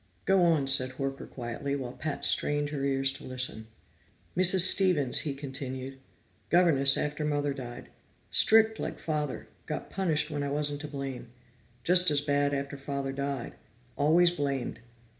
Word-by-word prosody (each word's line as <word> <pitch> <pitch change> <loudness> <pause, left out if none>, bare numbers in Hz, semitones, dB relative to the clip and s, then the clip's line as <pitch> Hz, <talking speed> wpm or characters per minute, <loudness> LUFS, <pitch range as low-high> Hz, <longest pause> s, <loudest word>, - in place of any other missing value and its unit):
"Go 195 -1 +3
on," 165 -5 +2
said 130 -1 +4
Horker 135 0 -5
quietly, 130 +3 -5
while 130 -3 -5
Pat 150 +2 -3
strained 145 0 +2
her 140 -2 -4
ears 135 -1 +1
to - - -11
listen. 130 -3 -2 0.7
"Mrs. 185 +1 +5
Stevens," 180 -7 +4
he 145 -4 -4
continued. 135 -1 -7 0.5
"Governess 150 -6 +4
after 150 +1 -3
Mother 145 -1 -1
died. 120 -3 -9 0.4
Strict 220 0 +4
like - - -5
Father, 150 -4 -4 0.2
got - - -6
punished 170 -7 0
when 145 -1 -3
I 140 - -3
wasn't 145 0 0
to 150 - -6
blame. 135 -4 -7 0.5
Just 180 +2 +5
as 145 -1 +3
bad 145 0 0
after 140 0 -4
Father 140 0 -4
died. 140 -2 -4 0.4
Always 165 +5 +3
blamed. 140 -7 -3
140 Hz, 150 wpm, -28 LUFS, 135-155 Hz, 0.7 s, Mrs